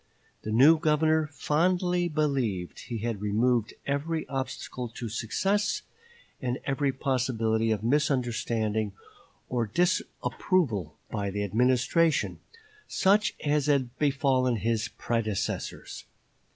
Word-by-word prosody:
The - - -6
new 145 +8 +6
Governor 155 0 +2
fondly 175 +4 +1
believed 135 - -1
he 120 - -5
had 115 -4 -2
removed 110 +2 +1
every 155 +3 -2
obstacle 130 -2 -4
to 115 +1 -6
success, 195 - 0 0.6
and 125 0 -1
every 135 0 +1
possibility 120 -4 0
of 110 -1 0
misunderstanding 115 -6 0 0.5
or 120 -3 -1
disapproval 140 - 0
by 100 -2 -2
the 100 +1 -2
Administration, 125 - +2 0.5
such 205 +2 +2
as 150 -1 +2
had 130 -4 +1
befallen 135 -4 +2
his 115 0 0
predecessors. 110 -4 -3
130 Hz, 100 wpm, -28 LUFS, 110-150 Hz, 0.6 s, new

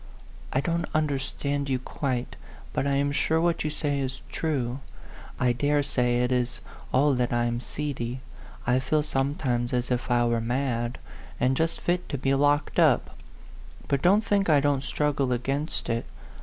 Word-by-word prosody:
"I 130 - +1
don't 170 +1 -1
understand 140 -1 -1
you 130 - +2
quite, 130 -1 -3 0.4
but 140 - 0
I 140 - +2
am 140 +1 +1
sure 160 +3 +1
what 170 0 +1
you 155 - 0
say 145 -2 -1
is 135 -1 -3
true. 135 -5 -1 0.6
I 125 -1 +3
dare 145 +4 +2
say 125 -3 +1
it 125 - 0
is 125 -1 0 0.3
all 140 +2 +4
that 125 -1 0
I'm 120 0 +1
seedy. 130 -3 -4 0.4
I 125 +1 +3
feel 150 +3 +1
sometimes 135 -4 -1
as 125 0 0
if 125 +1 -1
I 120 -1 +3
were 120 -1 +1
mad, 120 0 -1 0.4
and 130 +2 +2
just 165 +3 0
fit 180 +1 -1
to 140 - -2
be 135 +1 +1
locked 145 +1 +2
up. - - +3 0.7
But 140 -1 +1
don't 205 +5 +4
think 200 -2 +2
I 150 -2 +6
don't 140 -1 +1
struggle 140 -2 0
against 135 +5 -2
it. 115 0 -1
135 Hz, 170 wpm, -27 LUFS, 125-145 Hz, 0.7 s, I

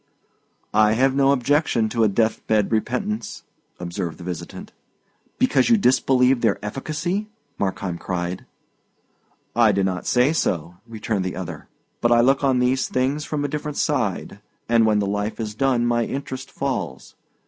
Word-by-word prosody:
"I 105 0 +4
have 130 +3 +3
no 135 0 +4
objection 140 -3 +2
to 115 0 +1
a - - +5
death 110 +2 +1
bed 105 -2 +2
repentance," 110 0 -2 0.4
observed 85 -1 -4
the 90 - -10
visitant. 85 -1 -7 0.7
"Because 255 -1 +3
you 230 - +6
disbelieve 130 - +3
their 110 -4 +2
efficacy!" 160 - -3 0.3
Markheim 95 -3 -2
cried. 90 0 -4 1.1
"I 115 -2 +5
do 100 -1 +1
not 95 -1 -2
say 125 +5 +3
so," 85 - -1
returned 110 -3 -2
the 90 - -3
other; 95 -3 -7 0.3
"but 120 - +2
I 120 - +6
look 135 +3 +3
on 135 -2 +3
these 125 +1 +1
things 135 +4 -1
from 145 -1 -2
a - - +1
different 150 0 -4
side, - - -1 0.3
and 115 -1 +4
when 105 -1 +3
the 105 - +1
life 105 +2 -2
is 110 -2 -3
done 125 0 +1
my 120 -1 +1
interest 135 -1 -5
falls. 140 -1 -4
120 Hz, 160 wpm, -22 LUFS, 105-135 Hz, 1.1 s, you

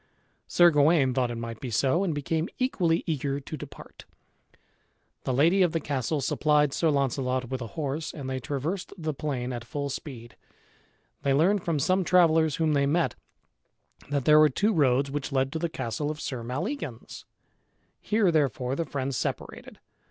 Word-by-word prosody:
Sir 175 -1 +5
Gawain 145 -3 +4
thought 125 -1 +1
it 120 - -4
might 115 -1 -6
be 130 - -5
so, 135 - +2
and 185 - 0
became 160 +3 -2
equally 180 -10 +1
eager 140 -3 -2
to 145 +3 -7
depart. 150 -2 -11 1.2
The - - 0
lady 165 +9 +3
of 175 -3 +3
the 165 - +1
castle 145 0 -2
supplied 150 +1 +2
Sir 165 - +1
Launcelot 130 -3 0
with 130 -1 -3
a 115 - -4
horse 150 +1 -2
and 140 -4 -7
they 130 0 -2
traversed 150 +8 -4
the 155 -3 -3
plain 130 -4 -3
at 120 -1 -5
full 140 +4 -4
speed. 120 -5 -8 0.9
They 140 -1 +2
learned 180 +6 +3
from 165 -3 0
some 185 +7 +2
travellers 160 -4 +4
whom 160 -2 +1
they 140 -1 +2
met, 165 +4 +1 1.0
that 140 -3 -1
there 150 0 +7
were 155 0 +6
two 210 - +1
roads 135 -4 +2
which 145 0 -4
led 135 0 +1
to 160 - -3
the 170 0 -1
castle 145 +1 -3
of 155 0 -5
Sir 130 -5 -4
Maleagans. 135 - -5 0.8
Here 210 -4 +2
therefore 135 -4 0
the 165 - -2
friends 135 -2 -3
separated. - - -5
145 Hz, 175 wpm, -27 LUFS, 130-165 Hz, 1.2 s, there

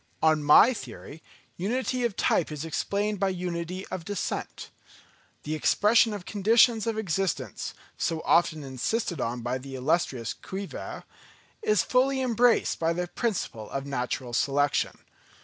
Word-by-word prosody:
On 155 -1 +4
my 150 - +7
theory, 160 - -9 0.4
unity 250 +6 -1
of 235 -5 0
type 160 - +2
is 150 +1 -5
explained 200 +5 -1
by 195 - +2
unity 180 0 -4
of 175 - -5
descent. 205 +1 -4 0.7
The 155 - -3
expression 215 +8 +4
of 205 -3 -6
conditions 220 +2 +3
of 225 -1 -1
existence, 175 - -2 0.2
so 160 -1 -1
often 160 -3 +3
insisted 140 - -2
on 120 +1 -2
by 125 +2 -2
the 135 +1 -8
illustrious 130 -4 0
Cuvier, 195 +1 -7 0.6
is 430 -1 +2
fully 265 +1 +2
embraced 245 -2 +2
by 165 0 +1
the 175 0 -3
principle 180 - -3
of 135 0 -4
natural 125 -2 -3
selection. 145 +3 +1
175 Hz, 135 wpm, -27 LUFS, 145-220 Hz, 0.7 s, my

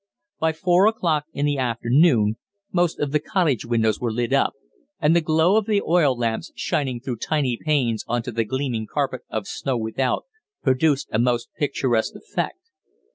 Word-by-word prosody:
By 160 0 +2
four 180 +4 +3
o'clock 165 -9 +1
in 145 -2 -1
the 145 -1 0
afternoon 120 -2 +3 0.3
most 175 -2 +1
of 145 -2 -1
the 150 - +2
cottage 155 - 0
windows 110 -3 +1
were 120 -2 -1
lit 120 +1 -1
up, - - +3 0.5
and 155 +3 +3
the 170 - +4
glow 160 +5 +3
of 220 -1 0
the 210 -2 +3
oil 155 -7 +3
lamps 115 +6 -2
shining 130 -4 -1
through 125 -1 -4
tiny 135 0 0
panes 125 -5 0
on 120 0 -1
to 125 - -5
the 115 0 0
gleaming 125 -2 -2
carpet 135 -4 -1
of 110 -3 -3
snow 135 -3 -2
without, 115 +3 -1 0.4
produced 140 +1 +2
a 110 - +1
most 120 0 +1
picturesque 130 -6 0
effect. - - -5
135 Hz, 175 wpm, -23 LUFS, 120-155 Hz, 0.5 s, the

